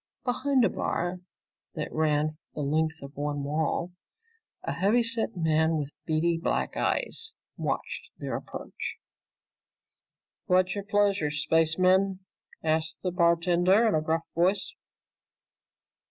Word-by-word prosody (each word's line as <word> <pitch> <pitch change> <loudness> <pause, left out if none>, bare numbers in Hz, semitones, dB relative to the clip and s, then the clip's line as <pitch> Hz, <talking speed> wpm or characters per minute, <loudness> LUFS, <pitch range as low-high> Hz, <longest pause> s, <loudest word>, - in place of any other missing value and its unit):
Behind 255 0 +2
a - - +3
bar 175 +1 -2 0.6
that 155 -2 -4
ran 155 -1 +1 0.2
the 150 - -3
length 155 +2 0
of 140 +1 -10
one 145 0 -2
wall, 160 +4 -1 0.7
a - - -2
heavy 220 +5 +3
set 230 -2 0
man 160 -1 +2
with 145 -1 -3 0.2
beady 165 +1 +1
black - - -1
eyes 450 0 -1 0.2
watched - - -3
their - - -4
approach. - - -6 1.5
"What's 185 -1 +3
your 200 -1 -4
pleasure, 205 -6 +2
spacemen?" 185 +5 +2 0.4
asked 160 0 0
the 180 - 0
bartender 175 +4 +4
in 220 - +2
a 155 - +2
gruff 160 +1 0
voice. 185 +4 +1
170 Hz, 120 wpm, -28 LUFS, 155-195 Hz, 1.5 s, bartender